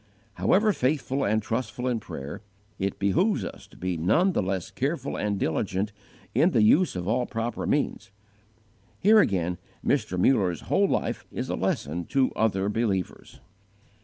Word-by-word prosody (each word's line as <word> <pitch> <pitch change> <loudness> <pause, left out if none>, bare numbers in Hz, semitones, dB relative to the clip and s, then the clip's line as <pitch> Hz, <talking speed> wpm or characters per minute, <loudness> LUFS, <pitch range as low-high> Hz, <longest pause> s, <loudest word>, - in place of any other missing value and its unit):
However 210 - +3
faithful 135 -1 0
and 110 +1 +1
trustful 115 +2 -3
in 120 -3 0
prayer, 75 0 -7 0.4
it 100 0 -1
behooves 135 - +1
us - - -9
to - - -19
be 90 -1 -2
none 110 - +3
the - - 0
less 95 -2 -3
careful 140 +1 -2
and 100 -2 -1
diligent 95 +5 -1 0.4
in - - +4
the 110 - +3
use 155 - +4
of 90 0 -4
all 120 +3 +1
proper 115 +1 -3
means. - - -1 0.9
Here 215 +3 +6
again 90 - +1 0.3
Mr. 90 - +1
Muller's 90 - +2
whole - - +2
life - - -2
is - - -4
a - - 0
lesson 85 +5 -2
to 135 -2 +1
other 100 -3 +1
believers. 105 -4 -2
110 Hz, 155 wpm, -26 LUFS, 95-130 Hz, 0.9 s, Here